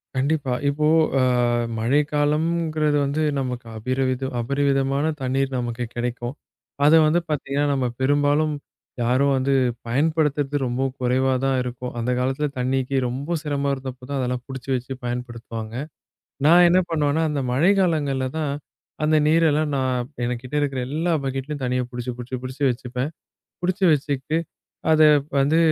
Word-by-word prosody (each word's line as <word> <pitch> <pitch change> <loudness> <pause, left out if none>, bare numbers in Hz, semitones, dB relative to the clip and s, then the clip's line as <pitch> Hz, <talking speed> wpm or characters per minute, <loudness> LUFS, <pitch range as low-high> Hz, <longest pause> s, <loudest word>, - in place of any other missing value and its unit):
கண்டிப்பா. 140 0 0
இப்போ 150 +2 +1 0.3
அ - - +3 0.6
மழைக்காலம்ங்கிறது 150 +4 +1
வந்து 140 +3 -1 0.2
நமக்கு 125 -2 -4
அபரிவித 130 +2 -1
அபரிவிதமான 140 +2 +1 0.2
தண்ணீர் 135 +1 0
நமக்குக் 120 -1 -3
கெடைக்கும். 120 +1 -3 0.5
அத 150 - +6
வந்து 160 +3 +3
பாத்தீங்கன்னா, 145 -1 0
நம்ம 135 -2 0 0.2
பெரும்பாலும் 145 +2 +2 0.5
யாரும் 130 +4 +2
வந்து 135 +1 +1 0.3
பயன்படுத்துறது 145 +1 +1
ரொம்ப 125 +2 -1 0.2
குறைவாதான் 130 +1 +1
இருக்கும். 125 0 -5
அந்தக் 125 +1 0
காலத்துல 135 +4 0
தண்ணிக்கு 130 +1 0
ரொம்ப 140 +7 -3
சிரமம் 140 -2 -1
இருந்தப்போ 130 -1 -7
தான் 140 -1 -1
அதெல்லாம் 125 -1 -2
புடிச்சு 135 -1 -8
வச்சு 125 +1 -4
பயன்படுத்துவாங்க. 120 -2 -5 0.7
நான் 175 +3 +7
என்ன 180 +2 +5
பண்ணுவேன்னா, 150 -1 +1
அந்த 145 -2 -1
மழை 155 +9 +4
காலங்கள்ல 145 -7 +1
தான் 150 -3 -1 0.5
அந்த 155 +1 +3
நீரெல்லாம் 155 -1 +3
நான் 130 -2 0 0.2
என்கிட்ட 125 +3 -4
இருக்கிற 135 -3 -1
எல்லா 160 +5 0
பக்கெட்லயும் 135 +2 -4
தண்ணிய 125 0 0
புடிச்சு, 125 0 -4
புடிச்சு, 125 +1 -5
புடிச்சு 130 +2 -6
வச்சுப்பேன். 125 +3 -3 0.5
புடிச்சு 185 +2 0
வச்சிக்கிட்டு, 145 +1 -1 0.5
அத 155 0 +5 0.4
வந்து 145 +4 +3
135 Hz, 130 wpm, -23 LUFS, 125-150 Hz, 0.7 s, நான்